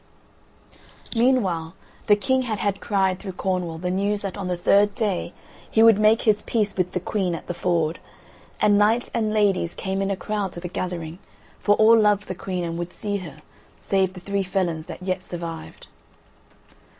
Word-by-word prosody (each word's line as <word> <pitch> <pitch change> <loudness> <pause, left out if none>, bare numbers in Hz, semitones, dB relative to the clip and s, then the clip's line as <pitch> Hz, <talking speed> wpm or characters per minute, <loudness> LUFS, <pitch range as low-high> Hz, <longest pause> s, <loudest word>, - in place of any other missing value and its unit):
Meanwhile 195 -9 +1 0.3
the 205 - +7
King 260 +6 +1
had 230 -4 -2
had 200 0 -1
cried 190 -3 +1
through 190 -3 -6
Cornwall 180 -3 -2
the 180 +2 -2
news 200 +2 0
that 195 -2 -4
on 200 -3 -4
the 180 -1 -1
third 200 +3 +3
day 205 -7 -1 0.4
he 220 - +4
would 225 -2 +7
make 215 +1 +4
his 215 -2 +3
peace 210 -3 -1
with 180 -1 -1
the 180 - 0
Queen 185 -1 -1
at 165 - -8
the 175 - -4
Ford, 170 -2 0 0.6
and 205 -1 +4
knights 225 +4 +2
and 220 -2 0
ladies 200 -5 +1
came 195 0 -2
in 195 - 0
a 195 - -1
crowd 205 -3 -3
to - - -6
the 175 - -5
gathering, 175 -2 -5 0.4
for 205 - +3
all 220 +2 +6
loved 210 -1 +2
the - - -3
Queen 185 0 -4
and 170 0 -3
would 175 +1 -5
see 205 -2 -3
her, 165 -7 -9 0.4
save 190 -1 +1
the 185 - -9
three 200 +2 -2
felons 180 -4 -2
that - - -8
yet 185 0 -1
survived. 170 -3 -7
190 Hz, 185 wpm, -24 LUFS, 180-210 Hz, 0.6 s, the